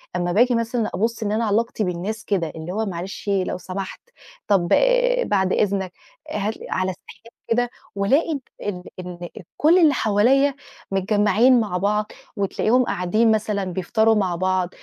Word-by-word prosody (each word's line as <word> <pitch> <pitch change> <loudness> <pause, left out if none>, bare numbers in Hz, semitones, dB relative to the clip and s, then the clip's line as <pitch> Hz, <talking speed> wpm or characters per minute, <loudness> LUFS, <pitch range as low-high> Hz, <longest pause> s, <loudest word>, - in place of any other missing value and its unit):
أما 175 0 0
باجي 240 +6 +3
مثلًا 230 0 -1
أبصّ 225 +4 -1
إن 205 - -1
أنا 225 +2 0
علاقتي 220 +1 0
بالناس 190 +4 -4
كده، 180 -6 0
اللي 160 +2 -6
هو 220 +2 -1
معلش، 190 +2 -6
لو 195 -3 0
سمحت، 190 +1 -6 0.5
طب 195 -4 +2 0.6
بعد 190 -2 +1
إذنك، 195 -3 0 0.4
هات 210 -2 -1 0.2
على 185 0 0
استحياء 230 +5 -15
كده، 245 +1 +1 0.3
وألاقي 275 +10 +1 0.2
ال 185 -3 -4 0.2
إن 175 -1 -7 0.3
كل 320 +4 +5
اللي 315 -4 +5
حواليّا 255 +5 +3 0.4
متجمعين 210 +5 +3
مع 205 -5 -1
بعض، 210 +3 0 0.3
وتلاقيهم 215 +5 +1
قاعدين 210 +2 +1
مثلًا 210 -2 0
بيفطروا 190 +5 +1
مع 190 -4 0
بعض، 185 0 0
205 Hz, 145 wpm, -22 LUFS, 185-225 Hz, 0.6 s, كل